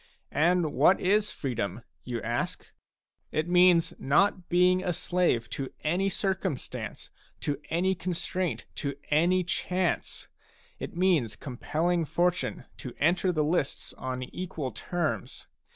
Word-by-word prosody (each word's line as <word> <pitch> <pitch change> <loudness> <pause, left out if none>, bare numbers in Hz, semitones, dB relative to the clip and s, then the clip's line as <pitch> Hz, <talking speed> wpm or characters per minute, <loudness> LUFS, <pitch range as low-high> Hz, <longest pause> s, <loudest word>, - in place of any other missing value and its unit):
And 165 0 +3
what 155 +8 +5
is 210 +3 +3
freedom, 120 -4 -3 0.2
you 120 -2 -4
ask? 120 +1 -3 0.6
It 155 +2 0
means 175 -1 +5
not 180 +6 +2
being 180 +1 +4
a 180 - 0
slave 175 -9 +1
to 135 -2 -4
any 180 +5 +1
circum 190 -7 -1
stance, - - -7 0.3
to 145 -1 -2
any 180 +3 +2
constraint, 175 -6 -2
to 140 -1 -2 0.2
any 175 +5 +4
chance; 180 0 -1 0.5
it - - -6
means 165 - +2
compelling 160 +9 -1
Fortune 175 +3 0
to 125 - -7
enter 175 +4 +3
the 155 -3 +1
lists 150 -2 -1
on 130 0 -4
equal 155 -1 -5
terms. 155 - -3
170 Hz, 125 wpm, -28 LUFS, 140-180 Hz, 0.6 s, what